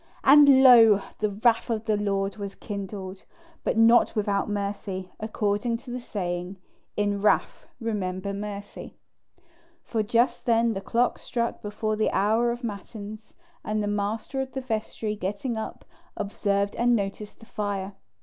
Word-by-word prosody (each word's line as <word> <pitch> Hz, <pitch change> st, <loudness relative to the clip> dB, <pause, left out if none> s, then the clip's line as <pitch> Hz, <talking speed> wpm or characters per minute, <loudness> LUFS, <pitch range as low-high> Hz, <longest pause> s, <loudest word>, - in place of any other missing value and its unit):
And 275 Hz, -1 st, +8 dB
lo! 225 Hz, -6 st, +8 dB, 0.2 s
the 215 Hz, -, +1 dB
wrath 225 Hz, +4 st, +1 dB
of 225 Hz, -1 st, -2 dB
the 215 Hz, -, +2 dB
Lord 200 Hz, -1 st, -1 dB
was 200 Hz, -1 st, -6 dB
kindled, 195 Hz, -2 st, -6 dB, 0.4 s
but -, -, 0 dB
not 230 Hz, +2 st, +5 dB
without 205 Hz, -1 st, 0 dB
mercy, 200 Hz, -2 st, -4 dB
according 215 Hz, +1 st, -1 dB
to 245 Hz, +1 st, -11 dB
that 250 Hz, -, -3 dB
saying, 180 Hz, -4 st, -4 dB, 0.4 s
"In 205 Hz, -1 st, 0 dB
wrath 210 Hz, -, +1 dB
remember 200 Hz, -4 st, -3 dB
mercy"; 205 Hz, 0 st, -7 dB, 0.9 s
for 225 Hz, -, -1 dB
just 235 Hz, +5 st, +1 dB
then 230 Hz, 0 st, +3 dB
the 195 Hz, -, -4 dB
clock 240 Hz, +4 st, 0 dB
struck 235 Hz, -2 st, -3 dB
before 215 Hz, +1 st, -2 dB
the 215 Hz, -, +1 dB
hour 220 Hz, +4 st, +2 dB
of 240 Hz, +1 st, -6 dB
matins, 215 Hz, 0 st, -7 dB, 0.3 s
and 215 Hz, 0 st, -1 dB
the -, -, -1 dB
master 210 Hz, +6 st, -2 dB
of 265 Hz, 0 st, -6 dB
the 265 Hz, -, -3 dB
vestry 220 Hz, -3 st, -3 dB
getting 205 Hz, +5 st, -3 dB
up, 220 Hz, -, -6 dB, 0.3 s
observed 200 Hz, 0 st, -1 dB
and 240 Hz, 0 st, +3 dB
noticed 205 Hz, 0 st, -4 dB
the 225 Hz, -, -14 dB
fire. 200 Hz, -2 st, -3 dB
210 Hz, 150 wpm, -26 LUFS, 200-230 Hz, 0.9 s, And